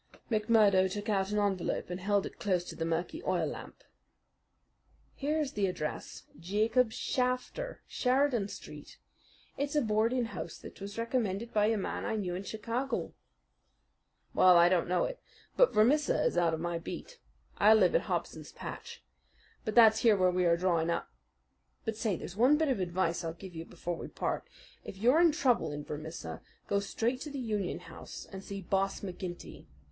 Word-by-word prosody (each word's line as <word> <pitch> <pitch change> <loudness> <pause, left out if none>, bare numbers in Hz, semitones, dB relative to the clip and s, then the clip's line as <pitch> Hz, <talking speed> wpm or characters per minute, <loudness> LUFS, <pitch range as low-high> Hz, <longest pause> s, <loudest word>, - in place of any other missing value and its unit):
McMurdo 210 -4 +4
took 205 +2 -4
out 195 -2 +1
an 210 - -1
envelope 195 -3 -1
and 180 - -3
held 200 +1 +1
it - - -9
close 185 -4 +1
to - - -8
the 165 - -2
murky 170 - -2
oil - - +1
lamp. - - -8 1.3
"Here 295 +3 -1
is 290 -3 -1
the 200 -2 +1
address 155 -4 -5 0.2
Jacob 220 +7 +2
Shafter, 255 - -2
Sheridan 255 -4 +1
Street. - - -10 0.6
It's 285 +1 -2
a 295 - +4
boarding 225 +3 +1
house 230 - -6
that - - -12
was 200 +2 -7
recommended 230 -2 -1
by 210 -1 +3
a 225 0 +2
man 195 - -3
I - - -1
knew 190 -5 -2
in 180 - -3
Chicago." 230 +6 -3 1.2
"Well, 180 -1 +7
I 170 +1 +7
don't 180 -2 +2
know 180 +1 +2
it; - - -3 0.4
but - - +5
Vermissa 280 +8 +3
is - - +1
out 170 -2 +3
of - - -7
my 170 0 -2
beat. - - -8 0.4
I 215 +2 +7
live 190 -5 +4
at - - +4
Hobson's 160 -3 -3
Patch, - - -8 0.6
and 215 - -1
that's 220 -2 +7
here 225 -3 +5
where 185 -1 +4
we 180 0 +1
are 170 0 +4
drawing 170 -2 +1
up. 170 - -2 0.7
But, 225 - -2
say, 215 -3 0
there's 175 - -7
one 255 +7 +5
bit 315 -1 +1
of 255 - +1
advice 175 -1 0
I'll 165 -1 -3
give 185 +1 -11
you 165 0 -6
before 175 -1 -5
we - - -6
part: - - -3 0.4
If - - -8
you're 250 - +4
in 340 -2 +6
trouble 250 - +2
in 145 0 -5
Vermissa, 155 +3 -6 0.3
go 200 - +2
straight 235 +5 -1
to 300 - -5
the 285 - -6
Union 215 -7 -2
House - - -9
and 195 -1 -9
see 195 -1 -6
Boss 195 +2 0
McGinty. 180 - -7
205 Hz, 180 wpm, -31 LUFS, 180-235 Hz, 1.3 s, Well